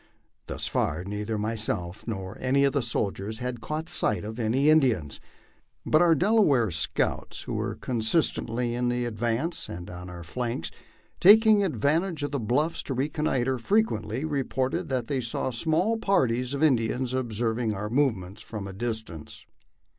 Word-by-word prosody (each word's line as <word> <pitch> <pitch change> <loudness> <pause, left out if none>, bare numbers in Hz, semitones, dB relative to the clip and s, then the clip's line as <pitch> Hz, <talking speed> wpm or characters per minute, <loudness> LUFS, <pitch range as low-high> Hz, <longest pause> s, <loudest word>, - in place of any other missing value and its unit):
Thus - - -3
far, 80 +3 0
neither 105 +3 -3
myself 105 -3 -2
nor 95 -4 -4
any 135 +2 +2
of 140 - +3
the 140 - +1
soldiers 110 -2 -2
had 125 -1 -4
caught 155 +7 -4
sight 105 - 0
of 110 +3 -6
any 120 +6 +2
Indians; 130 - +3 0.7
but 155 - +4
our 170 -2 +5
Delaware 155 - +3
scouts, 80 -2 -1
who - - -5
were - - -2
constantly 120 -1 0
in 120 0 0
the 120 0 0
advance 120 - -2
and 90 +1 -7
on 90 +1 -8
our 90 -1 -8
flanks, 120 +7 -3 0.5
taking 215 +1 +7
advantage 165 -1 0
of 145 - -2
the 140 - -1
bluffs 140 +9 0
to 135 - -4
reconnoitre, 135 -2 0
frequently 130 - 0
reported 135 -4 -1
that 130 -3 -1
they 135 +1 -1
saw 120 +2 -1
small 160 - +1
parties 125 - +1
of 140 - -1
Indians 125 -2 +2
observing 115 -2 -1
our 105 +2 -3
move 135 -2 +3
ments 95 +3 -10
from 105 -3 -6
a 100 - -7
distance. 110 -7 -5
120 Hz, 155 wpm, -27 LUFS, 110-145 Hz, 0.7 s, taking